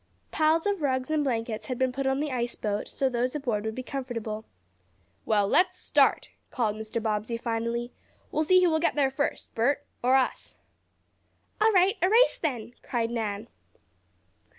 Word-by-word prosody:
Piles 315 +1 +2
of 405 -4 0
rugs 260 -1 0
and 305 -1 +2
blankets 230 -4 -2
had 255 - -3
been 260 0 +1
put 270 +1 -2
on 265 +1 +1
the 300 -1 -2
ice 240 -1 -2
boat 205 -1 -2
so 270 - 0
those 250 +1 -1
aboard 235 -8 -2
would 220 0 -3
be 255 - -5
comfortable. 230 -5 -5 0.8
"Well, 205 -2 +3
let's 365 - +3
start!" - - +2 0.2
called 220 -5 -1
Mr. 220 +1 -4
Bobbsey 220 +1 -2
finally. 235 +1 -2 0.4
"We'll 310 - +1
see 370 +3 +5
who 350 - +4
will 315 - +2
get 335 - +1
there 275 -2 +2
first, 285 +2 -3
Bert, 280 +5 +1 0.2
or 255 +2 +4
us." 265 -1 0 1.1
"All 440 +1 +5
right 380 0 +4
a 365 - +4
race 470 +4 +4
then!" 245 -7 -3
cried 235 -2 -2
Nan. 215 -3 -3
255 Hz, 175 wpm, -27 LUFS, 225-300 Hz, 1.1 s, see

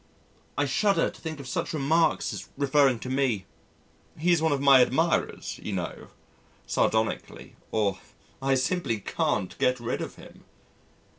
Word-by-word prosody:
I 145 - +2
shudder 200 +9 +2
to - - -17
think 160 -2 -5
of 140 - -8
such 130 - -2
remarks 155 +3 +2
as - - -7
(referring 140 -2 +3
to - - -6
me), 130 -7 0 0.7
"He's 170 +1 +2
one 160 -1 +2
of 140 - +1
my 135 -1 +7
admirers, 160 +7 0
you 105 - -4
know" 90 -3 -4 0.6
(sardonically), 110 0 -1
or, 100 -3 0 0.4
"I 135 0 +2
simply 130 - 0
can't 95 -1 -1
get 125 0 +2
rid 120 +1 -3
of - - -6
him." - - -15
135 Hz, 145 wpm, -27 LUFS, 120-155 Hz, 0.7 s, my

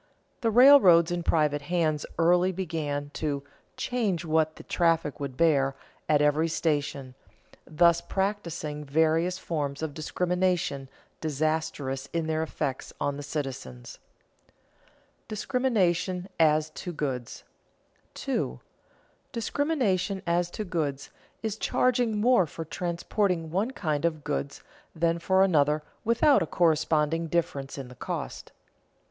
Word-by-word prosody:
The 230 - +2
railroads 220 -9 +7
in 175 0 -1
private 150 -3 +1
hands 155 -1 0
early 175 +2 +4
began 155 -6 -3
to 145 -3 -2 0.3
"charge 205 -9 -1
what 155 0 +1
the - - -11
traffic 165 -4 +1
would 140 -3 -5
bear" 135 -4 +3 0.3
at 150 -1 +4
every 150 +2 +3
station, 145 -5 -1 0.5
thus 170 +1 +4
practising 170 -6 -3
various 160 +5 +1
forms 145 -4 -3
of 155 -2 -3
discrimination 175 -3 -1 0.3
disastrous 150 -3 -2
in 165 -1 0
their 160 0 0
effects 145 -4 -3
on 145 - -1
the 145 - -6
citizens. 135 - -6 0.5
[Sidenote: - - -36
Discrimination 200 -7 0
as 155 -1 +3
to 180 - -6
goods] 135 -7 -4 0.7
2. 65 0 -2 0.7
_Discrimination 220 - 0
as 170 0 +1
to 215 - -5
goods 155 -7 -3 0.3
is 220 -1 -2
charging 240 -2 +1
more 230 -5 +4
for 165 +2 -7
transporting 170 0 -1
one 200 +7 0
kind 155 - -2
of 155 -3 -1
goods 145 -1 -3 0.3
than 165 +1 +1
for 190 +2 +3
another 150 -4 +2 0.2
without 235 +2 +4
a 165 - -1
corresponding 160 -1 +1
difference 145 -5 -2
in 135 -2 -6
the 125 - -12
cost. 125 - -6
165 Hz, 120 wpm, -27 LUFS, 150-185 Hz, 0.7 s, railroads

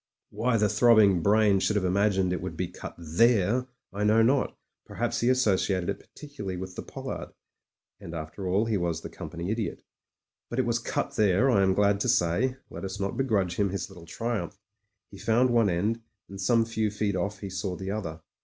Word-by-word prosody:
Why 120 0 +1
the 105 -1 +3
throbbing 105 -4 +5
brain 105 +1 +4
should 105 - +1
have 100 -3 +1
imagined 95 -1 +2
it 90 - -3
would - - -5
be - - -1
cut - - -9
there, 105 +8 +2 0.3
I 100 +1 -2
know 110 +2 +5
not; 130 +3 +1 0.3
perhaps - - -2
he 120 - +2
associated 100 -7 +2
it - - -6
particularly 140 -11 -8
with 95 0 -6
the - - -5
pollard - - -7 0.3
— - - -65
and 85 - -7
after 80 +4 -6
all 100 +5 +2
he 110 -2 0
was 85 -3 -1
the - - -8
Company 85 +3 -5
Idiot. 110 -2 -3 0.7
But 120 - -5
it 130 - +2
was 120 0 +1
cut - - -3
there, 105 +5 +4
I 100 - +4
am 95 -1 +3
glad 100 0 +3
to 125 - 0
say; 120 +5 +2
let - - -7
us 95 +1 -5
not 100 0 -2
begrudge 100 -10 0
him 100 -1 +2
his 100 +1 -4
little 85 -3 -13
triumph. 115 -6 -3 0.5
He 100 - -11
found 120 +3 +2
one 115 -3 +4
end, 105 +7 0 0.3
and 100 0 -8
some 115 +3 +3
few 110 -1 -1
feet 105 -1 -1
off 100 +2 -3
he 100 -2 -5
saw 90 0 -3
the 95 +1 -5
other. 80 -7 -4
100 Hz, 205 wpm, -27 LUFS, 95-115 Hz, 0.7 s, throbbing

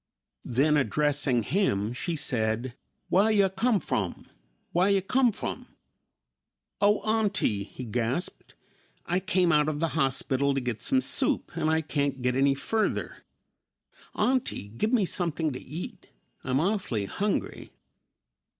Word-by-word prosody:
Then 145 +5 +3
addressing 145 -3 +1
him, 115 - 0
she 170 +7 -3
said, 120 -4 -1 0.4
"Wah 195 +4 +5
yo' 205 -3 +4
come 210 +3 +1
from? 100 - -3 0.5
Wah 175 +2 +3
yo' 200 0 +3
come 250 +5 +2
from?" - - -6 1.1
"Oh, 205 0 +4
auntie," 205 - +1
he 125 +5 -9
gasped, 120 - -3 0.5
"I 175 +2 +1
came 185 -2 +2
out 150 -1 +3
of 150 -1 -3
the 165 0 +1
hospital 135 -2 +1
to - - +1
get 120 -4 -3
some 260 - +2
soup - - +1
and 155 - 0
I 160 0 +2
can't 140 -4 -2
get 125 0 +1
any 135 +1 +3
further. 215 +10 -2 0.9
Auntie, 255 - 0
give 115 - -2
me 230 -6 +3
something 165 -4 -1
to 125 - -7
eat; 155 +6 -8 0.4
I'm 130 +1 0
awfully 170 - 0
hungry!" 205 - -2
150 Hz, 135 wpm, -27 LUFS, 130-195 Hz, 1.1 s, Wah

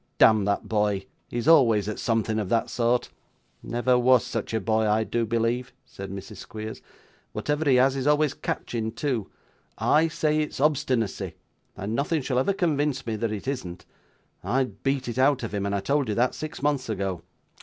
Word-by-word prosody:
'Damn 110 -3 +6
that 100 0 -1
boy, 105 -3 0 0.2
he's 120 -1 -3
always 115 - +5
at 105 - -4
something 110 -2 0
of 100 -3 -3
that 115 +2 +1
sort.' 120 0 +1 0.5
'Never 125 +1 +1
was 125 0 +4
such - - -4
a 110 - 0
boy, 110 +1 +1
I 110 +1 +3
do 115 +1 -1
believe,' 115 +3 -1
said 100 -6 -8
Mrs. 95 0 -8
Squeers; 110 0 -7 0.5
'whatever 150 0 0
he 130 - +6
has 130 +2 +4
is 135 0 -2
always 150 -1 +3
catching 110 -5 -3
too. 125 -9 -2 0.5
I 155 +2 +3
say 155 -1 0
it's 150 -3 -3
obstinacy, 130 -7 0 0.4
and 100 +3 -4
nothing 145 +3 0
shall 125 -1 0
ever 135 - +2
convince 145 -7 0
me 115 -2 -2
that 115 0 -1
it 105 +3 -5
isn't. 95 -11 -4 0.6
I'd 125 -6 -1
beat 135 -1 0
it 120 +1 -3
out 135 -1 +3
of 115 - -4
him; 100 -1 -1
and 100 - -1
I 100 - -1
told 140 -1 0
you 105 - 0
that, 125 +3 +2
six 155 -2 -7
months 145 -4 0
ago. 95 -4 -2
120 Hz, 185 wpm, -26 LUFS, 110-140 Hz, 0.6 s, Damn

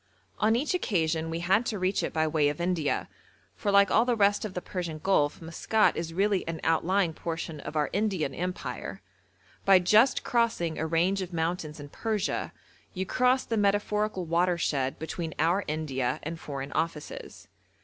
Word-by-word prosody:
On 220 +1 +3
each 280 +8 0
occasion 165 - 0
we 165 +1 -3
had 190 +6 +3
to 215 - -2
reach 185 +1 0
it - - -2
by 160 -1 +1
way 150 -2 +2
of 145 - -5
India, 170 -4 0 0.5
for 205 - -2
like 200 -1 +5
all 225 - +5
the 245 -1 +1
rest 205 -1 +3
of 210 -4 -5
the - - -1
Persian 170 -4 -4
Gulf 155 -2 +1
Maskat 210 +6 +2
is 165 0 -3
really 195 +2 +1
an 165 -1 -3
outlying 170 +2 +2
portion 165 -1 -5
of 150 - -7
our 150 -1 +2
Indian 200 -5 0
Empire. 180 +1 -5 0.6
By 195 -1 +7
just 215 +9 +4
crossing 230 -9 0
a 160 - -1
range 175 +5 +1
of 180 -1 -6
mountains 165 -2 -2
in 145 0 -9
Persia 215 +4 -2 0.4
you 190 +1 -2
cross 255 +5 +2
the 225 - -1
metaphorical 205 -1 +1
watershed 170 -5 +1
between 160 0 -5
our 170 +6 +2
India 145 -5 -2
and 165 +2 -5
Foreign 140 -2 -6
Offices. 160 -2 -4
175 Hz, 170 wpm, -28 LUFS, 160-200 Hz, 0.6 s, By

